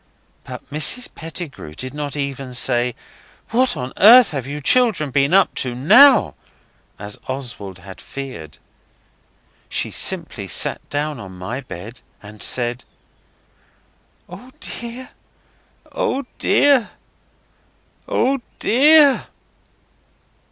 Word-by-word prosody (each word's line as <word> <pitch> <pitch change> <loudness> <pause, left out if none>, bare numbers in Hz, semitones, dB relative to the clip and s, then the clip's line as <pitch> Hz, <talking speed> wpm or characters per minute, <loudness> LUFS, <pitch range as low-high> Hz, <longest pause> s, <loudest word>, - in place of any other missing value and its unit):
But - - -10
Mrs 155 - -1
Pettigrew 160 - -8
did 130 - -7
not 145 -1 -5
even 135 -2 -5
say, 125 -1 +1 0.6
'What 255 +3 +2
on 125 +1 -5
earth 230 +1 +7
have 135 -4 -5
you 145 +1 -5
children 190 - +2
been 140 +1 +1
up 195 +2 +4
to 125 -2 -3
NOW?' 245 - +6 0.6
as 105 +1 -8
Oswald 120 -8 -6
had 95 0 -12
feared. 130 - -9 1.1
She - - -2
simply - - -1
sat - - 0
down 145 -1 -3
on 95 -3 -10
my 110 +9 -5
bed 105 +3 -10 0.2
and 105 0 -14
said 120 0 0 1.4
'Oh, 255 +1 -12
dear! 240 +2 -7 0.8
oh, 275 0 -2
dear! 280 -6 +3 1.2
oh, 270 +2 0 0.2
dear! 285 +3 +4
140 Hz, 105 wpm, -19 LUFS, -, 1.4 s, earth